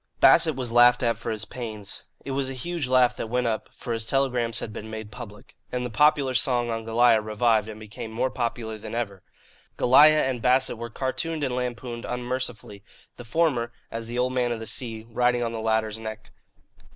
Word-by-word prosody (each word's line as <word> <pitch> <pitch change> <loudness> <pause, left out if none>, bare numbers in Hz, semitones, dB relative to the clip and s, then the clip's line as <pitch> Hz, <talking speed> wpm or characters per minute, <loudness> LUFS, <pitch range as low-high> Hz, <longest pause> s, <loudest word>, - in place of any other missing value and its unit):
Bassett 160 -4 +6
was 125 -3 -3
laughed 120 +1 +6
at 115 -2 +1
for 115 - -5
his 110 -1 -2
pains. 110 -3 -6 0.2
It 140 - -4
was 135 0 -1
a 135 - -5
huge 165 +2 -3
laugh 125 -1 +4
that 115 - -4
went 125 +1 0
up 110 -2 -2
(for 120 - -5
his 115 -1 0
telegrams 120 -3 +1
had 110 - -6
been 110 -1 -7
made 110 -1 -7
public), 105 -3 -11 0.2
and 125 0 -2
the 125 - -5
popular 140 +1 +3
song 120 -1 +1
on 115 0 -3
Goliah 115 0 +4
revived 110 0 +1
and 110 0 -8
became 110 +2 -8
more 125 +4 -1
popular 115 -2 -3
than 110 +1 -7
ever. 100 -5 -3 0.6
Goliah 150 +5 +6
and 125 -3 -2
Bassett 125 -1 +2
were 115 0 -5
cartooned 145 +6 -3
and 130 -3 -1
lampooned 120 -1 -4
unmercifully, 125 -4 -4 0.3
the 120 - -8
former, 120 -3 +1 0.2
as 115 0 -5
the 120 +1 -5
Old 125 +1 +1
Man 125 -1 +1
of 115 - -2
the 110 - -6
Sea, 115 -2 -5
riding 120 +1 +1
on 115 - -2
the 115 - -4
latter's 110 0 0
neck. 110 -1 -8
120 Hz, 200 wpm, -25 LUFS, 110-125 Hz, 0.6 s, Bassett